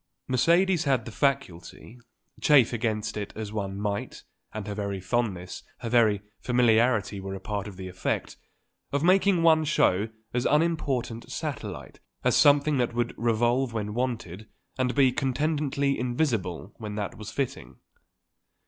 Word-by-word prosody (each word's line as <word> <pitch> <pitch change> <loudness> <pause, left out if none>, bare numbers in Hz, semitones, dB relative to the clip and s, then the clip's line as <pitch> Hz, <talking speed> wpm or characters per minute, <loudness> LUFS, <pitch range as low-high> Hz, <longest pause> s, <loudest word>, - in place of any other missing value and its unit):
Mercedes 170 +7 +3
had 130 -5 +1
the 115 - -7
faculty, 125 - -2 0.4
chafe 135 -6 +5
against 110 -2 -2
it 105 -1 -4
as 110 -1 -6
one 100 -2 -3
might 100 -1 -3 0.3
and 105 -2 -6
her 105 - -4
very 100 -1 -3
fondness, 95 -3 -2 0.2
her 115 - -3
very 110 -4 +3 0.2
familiarity 120 -4 +2
were 95 0 -5
a - - -6
part 100 0 -4
of 100 -3 -10
the 95 -1 -6
effect 90 0 -3 0.6
of 140 +1 0
making 185 0 +4
one 160 -1 +5
show 110 -9 +2 0.2
as 125 +1 +1
an - - +1
unimportant 140 -7 0
satellite, - - -5 0.2
as - - +3
something 145 0 +5
that 120 -1 0
would 120 0 -1
revolve 120 +2 +1
when 105 -2 -3
wanted 110 -5 -3 0.3
and 125 -1 -1
be 135 -3 +5
contentedly 140 +1 0
invisible 115 - -1
when 105 -2 -6
that 105 -1 -4
was 110 -1 -8
fitting. 125 - -4
120 Hz, 150 wpm, -27 LUFS, 105-140 Hz, 0.6 s, chafe